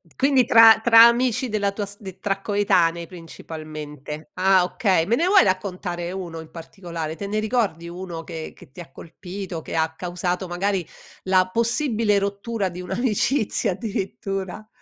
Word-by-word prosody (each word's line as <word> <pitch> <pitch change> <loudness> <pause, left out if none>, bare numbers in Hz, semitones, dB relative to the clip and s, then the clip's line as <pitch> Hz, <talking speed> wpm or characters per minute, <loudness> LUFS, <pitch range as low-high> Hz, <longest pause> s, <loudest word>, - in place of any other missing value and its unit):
Quindi 270 -2 +3
tra 225 -1 +8
tra 230 0 +8
amici 245 +1 +2
della 205 -2 0
tua 205 +1 -4
st 195 -2 -10
tra 195 0 -2
coetanei 175 -5 +1
principalmente, 155 -3 -9
ah 190 0 +4
okay. 185 -3 +1
Me 225 +6 +2
ne 330 - +1
vuoi 390 +1 +6
raccontare 180 -2 -2
1 175 -4 -6
in 160 -1 -11
particolare, 165 -2 -7
te 200 - -6
ne 210 +2 -1
ricordi 215 -7 -1
1 175 -2 -7
che 160 -2 -7
che - - -17
ti 140 - -14
ha 170 - -9
colpito 175 +3 -8
che - - -7
ha 160 0 0
causato 180 +1 -3
magari 185 +1 -1 0.4
la 185 -1 +2
possibile 230 -2 +1
rottura 200 +1 -2
di 175 0 -9
un'amicizia 215 +5 0
addirittura? 195 0 -5
190 Hz, 155 wpm, -23 LUFS, 170-215 Hz, 0.4 s, tra